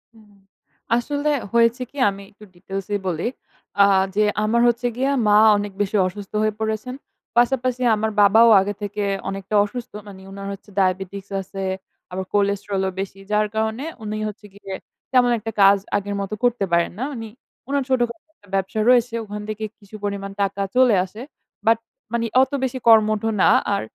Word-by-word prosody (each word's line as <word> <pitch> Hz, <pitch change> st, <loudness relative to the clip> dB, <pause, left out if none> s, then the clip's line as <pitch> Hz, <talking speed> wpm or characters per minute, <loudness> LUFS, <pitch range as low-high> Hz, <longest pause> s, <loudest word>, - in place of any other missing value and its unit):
হুম। 215 Hz, -2 st, -20 dB, 0.7 s
আসলে 285 Hz, +4 st, -1 dB, 0.2 s
হয়েছে 235 Hz, +2 st, +3 dB
কি 285 Hz, -, -16 dB
আমি 195 Hz, 0 st, -7 dB
একটু 210 Hz, -, -18 dB
ডিটেইলসে 195 Hz, +3 st, -5 dB
বলি। 170 Hz, -2 st, -2 dB, 0.6 s
আ -, -, +7 dB, 0.3 s
যে 215 Hz, -, +3 dB, 0.2 s
আমার 230 Hz, +2 st, +2 dB
হচ্ছে 240 Hz, +1 st, +1 dB
গিয়ে 265 Hz, +2 st, +1 dB, 0.2 s
মা 205 Hz, -, +5 dB, 0.2 s
অনেক 205 Hz, 0 st, -3 dB
বেশি 205 Hz, +1 st, -1 dB
অসুস্থ 195 Hz, +2 st, -9 dB
হয়ে 215 Hz, -1 st, +1 dB
পড়েছেন, 220 Hz, +3 st, -3 dB, 0.4 s
পাশাপাশি 255 Hz, 0 st, +2 dB
আমার 220 Hz, +1 st, -1 dB
বাবাও 220 Hz, +3 st, +6 dB
আগে 205 Hz, +2 st, -2 dB
থেকে 205 Hz, 0 st, -3 dB, 0.3 s
অনেকটা 195 Hz, +1 st, -4 dB
অসুস্থ। 245 Hz, +2 st, -7 dB, 0.2 s
মানে 190 Hz, -2 st, -11 dB
উনার 195 Hz, 0 st, -7 dB
হচ্ছে 195 Hz, -, -13 dB
ডায়াবেটিকস 190 Hz, +1 st, -1 dB
আছে, 195 Hz, +1 st, -7 dB, 0.5 s
আবার 190 Hz, +1 st, -4 dB
কোলেস্টেরলও 200 Hz, -1 st, 0 dB
বেশি। 195 Hz, 0 st, -5 dB
যার 210 Hz, 0 st, +2 dB
কারণে 220 Hz, +5 st, -1 dB, 0.2 s
উনি 215 Hz, 0 st, -4 dB
হচ্ছে 210 Hz, 0 st, -12 dB
গিয়ে 200 Hz, -1 st, -9 dB, 0.4 s
তেমন 245 Hz, -2 st, +4 dB
একটা 225 Hz, +1 st, -5 dB
কাজ 200 Hz, +1 st, +7 dB, 0.2 s
আগের 205 Hz, 0 st, -4 dB
মত 200 Hz, +1 st, -5 dB
করতে 240 Hz, -5 st, +2 dB
পারেন 170 Hz, 0 st, +2 dB
না। -, -, -1 dB
উনি 225 Hz, -3 st, -6 dB, 0.4 s
উনার 280 Hz, 0 st, +1 dB
ছোটখাটো 250 Hz, +4 st, -1 dB
একটা 205 Hz, -, -24 dB
ব্যবসা 195 Hz, +3 st, -1 dB
রয়েছে, 240 Hz, -2 st, +4 dB
ওখান 210 Hz, 0 st, -7 dB
থেকে 215 Hz, 0 st, -4 dB, 0.2 s
কিছু 205 Hz, 0 st, -14 dB
পরিমাণ 200 Hz, -1 st, -3 dB
টাকা 200 Hz, 0 st, -1 dB
চলে 250 Hz, -4 st, +5 dB
আসে। 210 Hz, +5 st, -11 dB, 0.5 s
বাট 225 Hz, 0 st, +6 dB, 0.4 s
মানে 235 Hz, 0 st, 0 dB, 0.2 s
অত 265 Hz, +1 st, +1 dB
বেশি 260 Hz, 0 st, -1 dB
কর্মঠ 215 Hz, -2 st, +5 dB, 0.2 s
না, -, -, +6 dB, 0.2 s
আর -, -, 0 dB
210 Hz, 170 wpm, -22 LUFS, 195-235 Hz, 0.7 s, আ